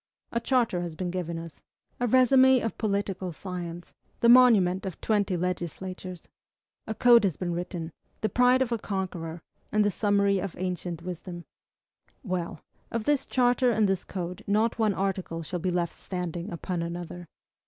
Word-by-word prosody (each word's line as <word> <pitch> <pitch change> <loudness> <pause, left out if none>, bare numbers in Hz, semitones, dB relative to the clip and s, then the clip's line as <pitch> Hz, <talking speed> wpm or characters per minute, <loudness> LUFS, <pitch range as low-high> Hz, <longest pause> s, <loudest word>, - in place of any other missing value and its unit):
A 235 - 0
charter 235 -7 +1
has 170 -2 -5
been 180 +1 -3
given 170 -2 -3
to 165 - -5
us, 165 -2 -12 0.4
a 245 - +1
resume 260 +1 +6
of 225 - -2
political 200 -3 -1
science, 175 0 -7 0.3
the 235 - +5
monument 220 -7 +6
of 190 -4 -6
twenty 205 -4 +1
legislatures. 180 +1 -4 0.6
A 220 - -3
code 240 -1 +6
has 185 -7 0
been 175 -2 -2
written, 170 -1 -4 0.3
the 215 - +2
pride 250 +5 +4
of 245 - -6
a 230 - 0
conqueror, 175 -5 -4 0.3
and 210 -1 +3
the 205 - +2
summary 200 0 +2
of 190 -1 -4
ancient 180 -2 -4
wisdom. 175 -1 -7 0.8
Well! 180 -5 -3 0.3
of 230 -1 -2
this 285 +2 +1
charter 250 0 +3
and 220 -3 +3
this 195 -2 0
code 180 -2 -5
not 220 +3 +1
one 215 -3 +2
article 190 -4 -2
shall 175 +3 -4
be 185 +2 -1
left 175 -1 -1
standing 180 0 -5
upon 175 +1 -3
another! 175 +1 -6
185 Hz, 165 wpm, -27 LUFS, 175-220 Hz, 0.8 s, resume